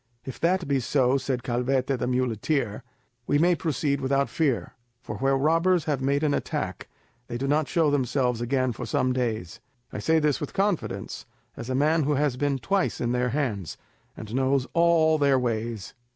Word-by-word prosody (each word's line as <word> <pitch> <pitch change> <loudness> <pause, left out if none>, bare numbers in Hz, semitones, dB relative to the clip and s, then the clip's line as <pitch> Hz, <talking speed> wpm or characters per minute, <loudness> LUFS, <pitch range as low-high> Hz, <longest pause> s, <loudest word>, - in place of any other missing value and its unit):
"If 130 - -7
that 180 0 +1
be 140 -1 +2
so," 130 +1 +2
said 130 -2 -2
Calvete, 130 +2 0
the 125 - -1
muleteer, 125 -1 -1 0.5
"we 145 - +3
may 175 +4 +4
proceed 145 -4 -1
without 140 +1 +1
fear, 145 -7 -1 0.3
for 105 - -7
where 135 +5 +1
the - - +3
robbers 165 +4 +2
have 145 -4 -1
made 140 +2 +1
an 150 -2 +2
attack, - - -3 0.4
they 120 - -4
do 135 +3 -2
not 150 +1 +2
show 160 -4 +2
themselves 125 -3 0
again 130 +1 0
for 115 - -6
some 130 0 +1
days. 110 -9 -3 0.3
I - - -4
say 160 +9 +2
this 150 -3 +1
with 150 - -5
confidence, 195 -3 -2 0.3
as 120 - -7
a 130 - -1
man 155 +4 +3
who 150 +1 +1
has 145 -2 +1
been 140 +1 0
twice 195 +7 0
in 120 0 -1
their 125 0 +1
hands, 115 - -2 0.4
and 110 0 -8
knows 135 0 +1
all 165 -2 +4
their 140 -2 +4
ways." 115 -4 -3
135 Hz, 185 wpm, -26 LUFS, 125-150 Hz, 0.5 s, may